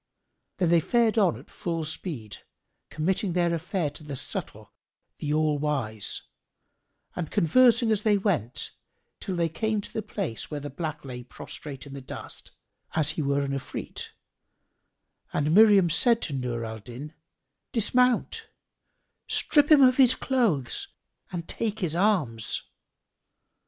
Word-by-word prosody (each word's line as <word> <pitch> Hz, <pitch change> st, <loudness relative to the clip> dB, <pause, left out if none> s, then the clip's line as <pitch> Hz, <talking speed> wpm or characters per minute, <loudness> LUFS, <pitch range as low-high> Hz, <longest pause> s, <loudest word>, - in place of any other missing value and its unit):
Then 180 Hz, -3 st, +2 dB
they 170 Hz, 0 st, +5 dB
fared 230 Hz, +5 st, +2 dB
on 185 Hz, -, +3 dB
at 130 Hz, -, -15 dB
full 165 Hz, -2 st, -3 dB
speed, 150 Hz, -, -5 dB, 0.5 s
committing 185 Hz, +4 st, 0 dB
their 175 Hz, -1 st, +2 dB
affair 165 Hz, -1 st, -1 dB
to 150 Hz, -, -10 dB
the 145 Hz, -2 st, -6 dB
Subtle, -, -, -5 dB, 0.5 s
the 150 Hz, -, -2 dB
All 155 Hz, -1 st, +2 dB
wise 130 Hz, -8 st, -2 dB, 0.9 s
and 170 Hz, -3 st, -3 dB
conversing 235 Hz, +6 st, +4 dB
as 215 Hz, -2 st, +2 dB
they 210 Hz, -1 st, +3 dB
went, 175 Hz, -, -1 dB, 0.5 s
till 190 Hz, -, -4 dB
they 170 Hz, -1 st, +1 dB
came 215 Hz, +7 st, -1 dB
to 205 Hz, -, -8 dB
the 220 Hz, -, -1 dB
place 195 Hz, -, -4 dB
where 150 Hz, -, -4 dB
the 145 Hz, 0 st, -7 dB
black 155 Hz, 0 st, -5 dB
lay 125 Hz, -2 st, -6 dB
prostrate 135 Hz, +3 st, -9 dB
in 140 Hz, -, -10 dB
the 140 Hz, -, -7 dB
dust, 130 Hz, -, -8 dB, 0.5 s
as 155 Hz, -2 st, +3 dB
he 155 Hz, -, -3 dB
were 140 Hz, 0 st, +1 dB
an 140 Hz, -1 st, -2 dB
Ifrit, 135 Hz, -2 st, -5 dB, 1.3 s
and 150 Hz, +2 st, +1 dB
Miriam 200 Hz, -4 st, +7 dB
said 235 Hz, +6 st, +4 dB
to 150 Hz, -, -3 dB
Nur 125 Hz, -3 st, -2 dB
al 110 Hz, 0 st, -6 dB
Din, 125 Hz, +8 st, -9 dB, 0.6 s
"Dismount; 250 Hz, +2 st, +2 dB, 0.8 s
strip 295 Hz, -1 st, +3 dB
him 290 Hz, -3 st, +8 dB
of 255 Hz, -1 st, +5 dB
his 260 Hz, -2 st, +6 dB
clothes 215 Hz, -, 0 dB, 0.4 s
and 170 Hz, -2 st, -5 dB
take 220 Hz, -2 st, -2 dB
his 175 Hz, -6 st, -1 dB
arms." 160 Hz, -, +1 dB
165 Hz, 145 wpm, -27 LUFS, 140-210 Hz, 1.3 s, him